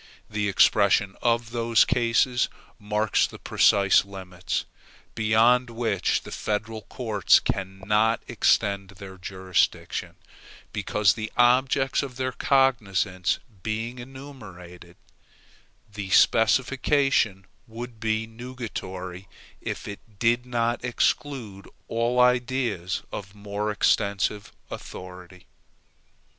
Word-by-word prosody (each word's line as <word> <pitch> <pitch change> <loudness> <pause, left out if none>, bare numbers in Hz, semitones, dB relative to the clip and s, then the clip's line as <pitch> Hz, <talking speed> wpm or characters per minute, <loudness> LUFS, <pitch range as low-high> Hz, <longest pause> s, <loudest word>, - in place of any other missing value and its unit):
The 105 -1 -1
expression 100 0 +3
of 115 -1 +1
those 115 -1 +3
cases 120 0 +2 0.3
marks 105 0 +1
the - - -11
precise 100 -1 +4
limits, 95 -2 -5 0.5
beyond 115 +3 +3
which 115 -3 -1
the - - -10
federal 110 +1 -3
courts 110 -1 +2
cannot 105 +4 0
extend 100 -4 +1
their 95 -1 -10
jurisdiction, 95 -1 -1 0.6
because 105 -3 +2
the 110 0 -5
objects 130 +2 +3
of 135 -3 -6
their 130 0 -1
cognizance 105 -10 +1 0.2
being 115 +4 -4
enumerated, 105 -10 -11 1.0
the 100 -2 -6
specification 120 -1 +3 0.2
would 115 0 -8
be 110 0 -1
nugatory 105 -6 -7 0.3
if - - -5
it 100 +1 -10
did 120 +3 +1
not 120 -1 -1
exclude 125 -4 -2 0.2
all 120 +2 0
ideas 125 -6 +1
of 100 0 -7
more 105 +1 -4
extensive 100 0 0 0.2
authority. 90 0 -10
110 Hz, 95 wpm, -25 LUFS, 100-120 Hz, 1.0 s, precise